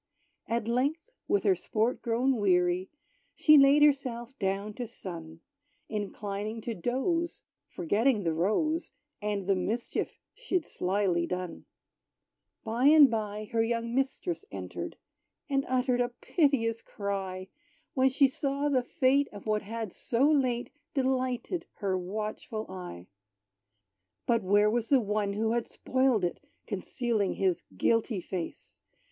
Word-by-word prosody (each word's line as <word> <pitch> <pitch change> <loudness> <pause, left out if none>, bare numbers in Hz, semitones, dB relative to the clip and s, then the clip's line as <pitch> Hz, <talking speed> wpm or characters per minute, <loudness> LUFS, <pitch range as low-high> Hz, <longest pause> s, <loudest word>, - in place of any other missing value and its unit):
At 230 -1 -1
length, 285 - 0 0.2
with 405 - +2
her 390 - +5
sport 230 -8 -1
grown 245 +2 +1
weary, 180 -2 +2 0.5
She 305 - +6
laid 280 +1 +7
herself 260 -4 +1
down 195 +2 -1
to 245 +2 -5
sun, 165 -7 -9 0.5
Inclining 210 +1 -4
to 230 - -3
doze, 265 - -1 0.2
forgetting 210 +6 +1
the 165 -2 +1
rose, 260 - 0 0.3
And 205 -2 -2
the 195 - +3
mischief 220 +6 -2
she'd 380 -10 -1
slily 180 -2 0
done. 180 -2 -4 1.0
By 235 +4 +2
and 295 -4 +8
by 215 -1 -3
her 230 -1 +2
young 230 0 -1
mistress 270 +8 -1
entered, - - -6 0.5
And 275 -2 +1
uttered 250 -1 +2
a 245 - +1
piteous 245 -4 +1
cry, 190 -2 -4 0.4
When 265 0 +4
she 275 +1 +4
saw 280 +2 -1
the 260 -3 +3
fate 265 +3 +2
of 205 -2 -10
what 215 -1 +1
had 220 -1 -5
so 250 +4 +1
late 255 -5 +1 0.2
Delighted 260 +4 -1
her 195 -2 -1
watchful 215 +3 -4
eye. 180 - -8 1.2
But, 230 -2 +2
where 205 +2 +4
was 230 0 -1
the 275 - +6
one 210 -2 -1
who 220 +2 0
had 235 0 0
spoiled 260 -7 +1
it 175 - -3 0.3
Concealing 230 -7 -1
his 185 -3 +1 0.2
guilty 230 - +2
face? 180 -1 -6
230 Hz, 130 wpm, -29 LUFS, 200-265 Hz, 1.2 s, and